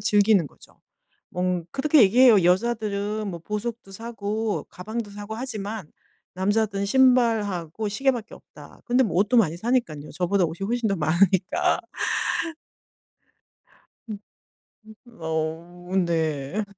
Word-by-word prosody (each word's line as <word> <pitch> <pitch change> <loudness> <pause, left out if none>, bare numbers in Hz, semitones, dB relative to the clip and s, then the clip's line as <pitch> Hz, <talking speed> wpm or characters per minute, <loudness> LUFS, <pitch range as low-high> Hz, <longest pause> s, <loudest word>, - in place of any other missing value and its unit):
즐기는 205 -3 +3
거죠. - - -19 0.5
뭐 180 -1 -1
그렇게 300 0 +4
얘기해요. 220 -1 +6
"여자들은 210 +1 0
뭐 170 -3 -6
보석도 210 +3 -5
사고 220 0 -3
가방도 215 +3 -6
사고 205 +1 -7
하지만 220 - -5 0.4
남자들은 200 +1 0
신발하고 220 -6 +2
시계밖에 240 +1 -1
없다." - - -16
근데 250 +1 +3
뭐 200 - -2
옷도 210 +6 +3
많이 175 -8 +3
사니깐요. 175 - -1
저보다 180 +3 +1
옷이 170 +4 -4
훨씬 235 0 0
더 200 - +1
많으니까. 175 +3 +2 2.3
음. 215 -2 -5 0.9
음 235 -6 -18
어 165 +3 -4
네. 160 +3 -1
205 Hz, 260 characters per minute, -24 LUFS, 180-225 Hz, 2.3 s, 얘기해요